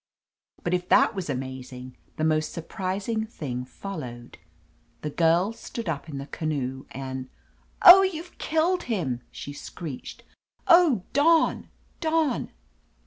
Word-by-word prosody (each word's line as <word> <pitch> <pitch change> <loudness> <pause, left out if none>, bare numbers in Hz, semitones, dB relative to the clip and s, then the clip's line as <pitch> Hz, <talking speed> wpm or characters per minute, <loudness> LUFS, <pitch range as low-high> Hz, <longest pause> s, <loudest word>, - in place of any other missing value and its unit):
But 175 - -1
if 180 0 -1
that - - +5
was 190 -5 -5
amazing, 130 -1 -6 0.2
the 155 - -1
most 155 0 +1
surprising 195 +6 -3
thing 125 - -5
followed. 125 - -8 0.6
The 150 - -4
Girl 170 +7 +3
stood 230 -1 -7
up 160 0 -3
in 140 - -5
the 135 - -5
canoe 135 -4 -3
and 130 -1 -6 0.3
— - - -36
Oh, 365 +2 +12
youVe 355 -2 -3
killed 330 +3 +1
him!" 140 - -1
she 145 - -8
screeched. 145 -1 -8 0.4
Oh, 340 - +6
Don! 320 +3 +3 0.3
Don!" 315 -5 0
165 Hz, 130 wpm, -26 LUFS, -, 0.6 s, Oh